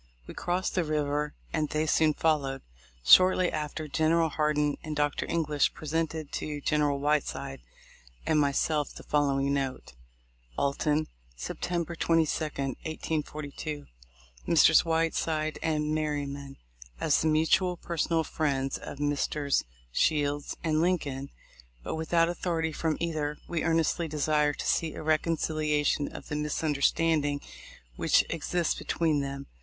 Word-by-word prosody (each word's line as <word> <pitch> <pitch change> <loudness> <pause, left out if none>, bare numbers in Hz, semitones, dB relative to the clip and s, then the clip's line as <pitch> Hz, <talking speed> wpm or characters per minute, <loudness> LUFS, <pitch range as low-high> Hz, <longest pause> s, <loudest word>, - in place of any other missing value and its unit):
We - - -9
crossed 180 +2 -1
the 180 - +1
river, 150 -1 -1 0.2
and 155 -2 0
they 155 +1 0
soon 155 -1 +3
followed. 140 -4 0 0.4
Shortly 185 - +7
after, 155 0 -4
General 160 +2 +2
Hardin 150 -1 +1
and 155 -1 -4
Dr. 145 -1 0
English 150 -4 +1
presented 160 -1 -2
to 150 -1 -4
General 145 -1 +1
Whiteside 140 -2 -1 0.6
and 155 - +3
myself 145 +1 +1
the - - -10
following 140 -1 +1
note: 135 -2 -3 0.6
Alton, 150 +2 +1 0.3
September 170 - -3
22, 165 -1 +1
1842. 150 +1 -4 0.6
Messrs. 160 -1 +6
Whiteside 160 -1 0
and 155 -1 0
Merbyman: 140 -3 -3 0.2
— - - -18
As - - +2
the - - +1
mutual 160 +3 +3
personal 165 -1 0
friends 135 -4 -1
of 145 - -8
Messrs. 145 0 0 0.3
Shields 145 - 0
and 155 -1 +2
Lincoln, 140 -6 -1 0.5
but - - -4
with 160 +1 -5
out 165 -1 +5
authority 170 -2 -1
from 155 0 -1
either, 155 -3 -2
we 170 -2 -2
earnestly 165 0 +1
desire 150 -1 +1
to - - -6
see 160 -2 +1
a - - -6
reconciliation 155 -2 +1
of - - -9
the 150 - -2
misunderstanding 150 0 +1 0.6
which - - +4
exists 170 +1 0
be - - -8
tween 160 -3 +1
them. 140 0 -4
155 Hz, 130 wpm, -29 LUFS, 145-160 Hz, 0.6 s, Shortly